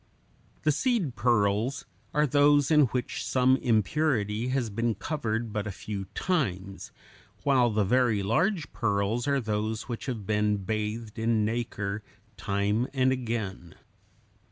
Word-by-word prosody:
The 155 - +4
seed 185 - 0
pearls 115 +2 +1 0.3
are 150 0 +2
those 145 +1 +4
in 150 -2 +6
which 125 0 -3
some 130 0 +3
impurity 115 -1 +1
has 130 -4 -1
been 115 +2 0
covered 115 -4 -3
but 105 0 -2
a - - -3
few 100 +1 -6
times, 100 - -2 0.5
while 130 -4 +4
the 105 -1 +1
very 120 -2 +2
large 160 - 0
pearls 105 +2 0
are 140 -1 +2
those 110 -1 -2
which 120 +1 -5
have 115 -6 -4
been 105 0 +1
bathed 110 +2 -4
in 110 -1 +2
nacre 110 -3 -2 0.3
time 105 +5 0
and 130 0 +3
again. 110 -9 -4
115 Hz, 130 wpm, -28 LUFS, 105-130 Hz, 0.5 s, in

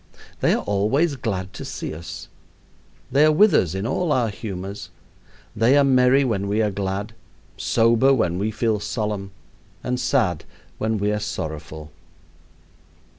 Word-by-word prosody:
They - - +3
are - - -3
always 130 +11 +1
glad 95 -7 -4
to - - -7
see - - -5
us. 80 +2 -8 0.8
They 140 +4 +4
are 155 - +6
with 205 +7 +5
us 90 -1 +2
in 95 +2 -3
all 160 +7 -1
our 120 -5 +2
humors. 100 -1 -6 0.7
They 125 +5 +4
are 145 - +5
merry 130 0 +4
when 100 -6 -1
we 105 +2 0
are 105 - 0
glad, 100 +2 -3 0.4
sober 115 +3 +3
when 90 -9 +1
we 105 +2 0
feel 110 0 0
solemn, 105 -2 -3 0.5
and 125 0 -2
sad 120 - +1 0.4
when 110 0 0
we 105 +1 0
are 105 - -1
sorrowful. 80 -6 -6
105 Hz, 150 wpm, -22 LUFS, 95-125 Hz, 0.8 s, are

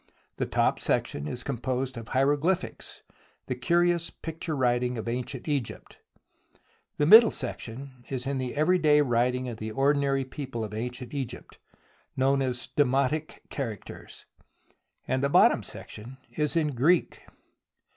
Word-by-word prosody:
The - - -1
top - - +1
section 70 +1 -1
is 120 +9 -4
composed 130 0 -2
of 115 -1 -8
hierogly 145 +7 +3
phics, 180 - -10 0.4
the - - -2
curious 175 -1 +1
picture 160 -1 -5
writing 125 -1 +1
of 110 - -5
ancient 125 +3 -4
Egypt, 140 -6 -3 1.0
the 145 - +2
middle 220 +7 +9
section 130 0 -6
is 130 -2 -3
in 135 0 -1
the 130 0 -4
everyday 155 -1 +4
writing 125 -1 +1
of 120 -3 -5
the 110 0 -5
ordinary 135 +2 +1
people 130 -3 -5
of 105 -1 -6
ancient 120 +3 -5
Egypt, 130 -4 -6 0.6
known 135 +1 +2
as 125 -1 -1
demotic 140 +2 +1
characters, 115 -7 -7 0.8
and 130 +1 0
the 140 - +2
bottom - - +5
section 120 +5 -8
is 150 +1 -1
in 160 -2 +2
Greek. 150 +8 +2
135 Hz, 135 wpm, -27 LUFS, 125-150 Hz, 1.0 s, middle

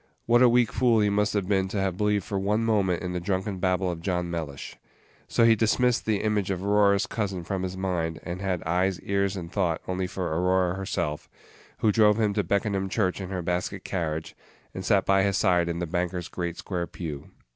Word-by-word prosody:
What 120 +1 +4
a 125 - +7
weak 120 -1 +3
fool 120 -3 +3
he 105 -1 +2
must 105 +1 +1
have 100 -3 0
been 95 -2 +1
to 100 +1 -3
have 95 -2 0
believed 105 0 +1
for 100 0 -3
one 105 +3 +1
moment 100 -6 +1
in 90 -1 -3
the 90 - -1
drunken 95 +2 -2
babble 90 0 +1
of 85 -1 -6
John 90 -1 -2
Mellish! 80 -5 -5 0.5
So 115 - +3
he 115 -1 +6
dismissed 115 +3 +1
the 105 -2 +1
image 105 -3 0
of 95 0 -2
Aurora's 100 -1 +3
cousin 100 -5 -3
from 95 +2 -3
his 95 0 -4
mind, 85 -4 -2
and 90 +1 -5
had 95 -3 -2
eyes, 90 +2 0
ears, 100 0 0
and 85 -3 -6
thought 90 -5 0
only 95 0 -1
for 90 -4 -3
Aurora 90 +1 +2
herself, 85 -5 -3 0.5
who 110 - +4
drove 105 0 +4
him 105 -2 +2
to 105 0 0
Beckenham 100 +1 0
church 95 -2 0
in 95 - -6
her 90 -2 -3
basket 90 +2 -2
carriage, 80 -4 -3 0.4
and 95 - -5
sat 100 0 +2
by 95 0 +4
his 100 0 +1
side 90 -2 +2
in 85 - -2
the 85 - -2
banker's 90 +1 -2
great 85 -1 -4
square 90 -3 -3
pew. 75 -5 -7
95 Hz, 215 wpm, -26 LUFS, 90-100 Hz, 0.5 s, a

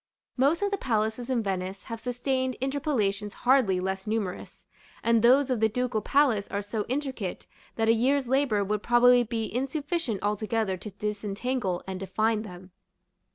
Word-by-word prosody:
Most 285 +9 +2
of 405 - 0
the 400 - -1
palaces 220 +1 -1
in 245 -3 +1
Venice 190 -1 -3
have 230 -1 -6
sustained 255 +1 -1
interpolations 235 -7 -1
hardly 245 -8 +4
less 190 +2 -3
numerous; 210 -4 -4 0.4
and 230 -1 +3
those 260 +3 +5
of 250 - +1
the 220 0 +3
Ducal 245 -1 -1
Palace 250 -5 +2
are 200 +1 -3
so 210 +1 -3
intricate, 260 -8 -3 0.3
that 225 -1 0
a 225 - +6
year's 260 +3 +2
labor 255 -6 +2
would 210 +1 -1
probably 245 +1 +5
be 225 -2 -3
insufficient 275 - -2
altogether 210 -1 0
to 185 +4 -8
disentangle 210 0 -3
and 190 -1 -5
define 215 +3 0
them. 185 -3 -10
225 Hz, 155 wpm, -27 LUFS, 205-260 Hz, 0.4 s, a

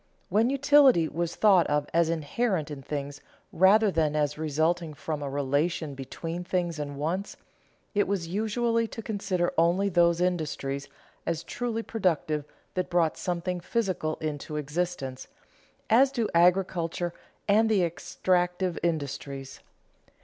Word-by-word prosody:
_ - - -40 0.3
When 220 +4 +3
utility 275 - +5
was 170 +2 -3
thought 195 -5 +5
of 145 0 0
as 165 -1 +3
inherent 165 +1 -1
in 140 -2 -6
things 145 +1 -5 0.3
rather 200 +4 +5
than 155 -3 +1
as 150 -1 +1
resulting 160 +1 0
from 150 0 -4
a 140 - -3
relation 145 +3 -1
between 165 +6 -6
things 175 -3 -1
and 145 -1 -5
wants, 170 +7 -3 0.6
it 205 -1 +2
was 190 -4 -1
usual 230 +4 0
to 225 - -7
consider 195 -5 -1
only 175 +4 +3
those 170 -1 +3
industries 150 -6 -1 0.4
as 165 -1 -1
truly 230 -2 -3
productive 160 -9 -1 0.3
that 185 -1 -2
brought 170 -3 +2
something 180 0 -2
physical 180 -5 -1
into 150 0 -5
existence, 150 -3 -3 0.6
as 260 +5 +5
do 235 -5 0
agriculture 175 -1 +2 0.3
and 220 +2 +4
the 205 -4 +3
extractive 180 +1 0
industries. 140 -4 -3
170 Hz, 135 wpm, -27 LUFS, 150-195 Hz, 0.6 s, utility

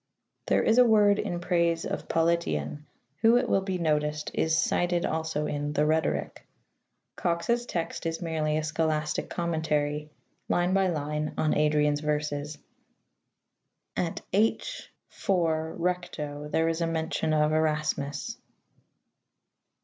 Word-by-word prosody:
There - - +3
is 225 +3 +4
a - - +9
word 210 -3 +5
in 175 -4 -2
praise 170 -2 +1
of - - -4
Politian, 160 - 0 0.3
who, 225 +7 +5
it 245 - +1
will 195 - +2
be 190 -1 -2
noticed, 150 -2 0
is 160 0 +1
cited 175 +2 +1
also 160 -1 -1
in 145 0 -2
the 150 0 +2
Rhetoric. 160 +1 0 0.7
Cox's 235 +8 0
text 165 -1 -3
is 165 0 -2
merely 155 -3 -1
a 155 - -1
scholastic 155 -1 -1
commentary, 150 -3 -1 0.4
line 175 +1 +2
by 195 -1 +3
line, 150 -2 -2
on 155 - +2
Adrian's 150 -1 +2
verses. 150 0 -2 1.4
At 170 -2 -2
H 225 - 0 0.4
iiij 160 -4 +1
recto 160 -5 -3
there 160 +2 +1
is 165 +1 -1
a 165 - +1
mention 160 -1 -1
of 155 0 +3
Erasmus. 155 - -1
160 Hz, 125 wpm, -28 LUFS, 150-175 Hz, 1.4 s, a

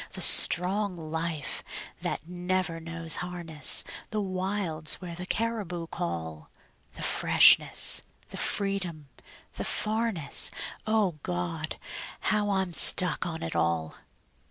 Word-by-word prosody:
The - - -5
strong 190 +2 +7
life 160 -3 -5 0.4
that 155 - -5
never 180 -1 -3
knows 165 -1 -2
harness; 175 -4 +3 0.3
The 215 - -3
wilds 185 -5 -3
where 175 -2 -9
the 180 +2 -8
caribou 205 -7 -3
call; 80 - -6 0.5
The - - -8
freshness, - - +4 0.3
the - - -9
freedom, 185 -7 -3 0.5
the - - -4
farness 215 -7 0 0.4
O 210 -7 0
God! 90 -5 -5 0.6
how 210 -1 -1
I'm 190 -3 -2
stuck 180 +1 +4
on 160 -1 -6
it 80 - -5
all. 85 -1 -1
175 Hz, 110 wpm, -27 LUFS, 155-195 Hz, 0.6 s, strong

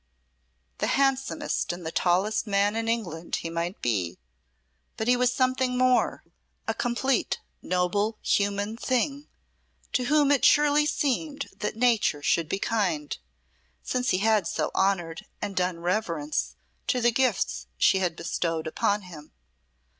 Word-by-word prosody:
The - - 0
handsomest 270 - 0
and 175 -1 -7
the 160 - -3
tallest 190 +7 +1
man 200 +1 +2
in 225 0 -2
England 175 -8 -2
he 165 - -4
might 170 +3 -3
be, 95 -8 -1 0.8
but 220 - -2
he 250 - +5
was 250 0 +2
something 255 0 +1
more 255 0 +2 0.4
a - - +1
complete 250 +2 0 0.2
noble 200 +4 0
human 205 +2 0
thing, 275 +4 -1 0.7
to 250 - +1
whom 290 +1 +3
it 280 - +3
surely 295 0 +5
seemed 285 0 -1
that 210 - -3
nature 225 -11 +2
should 165 0 +1
be - - 0
kind, 185 -10 -1 0.7
since 250 0 -1
he - - +3
had 215 0 +2
so - - -1
honoured 190 -1 0
and 205 -2 -4
done 180 -2 -1
reverence 170 -5 -1 0.3
to 255 - +1
the 240 0 +3
gifts 245 -4 0
she 190 - +4
had 180 -3 0
bestowed 165 -1 -2
upon 205 +6 0
him. 160 -5 -12
210 Hz, 140 wpm, -27 LUFS, 175-250 Hz, 0.8 s, he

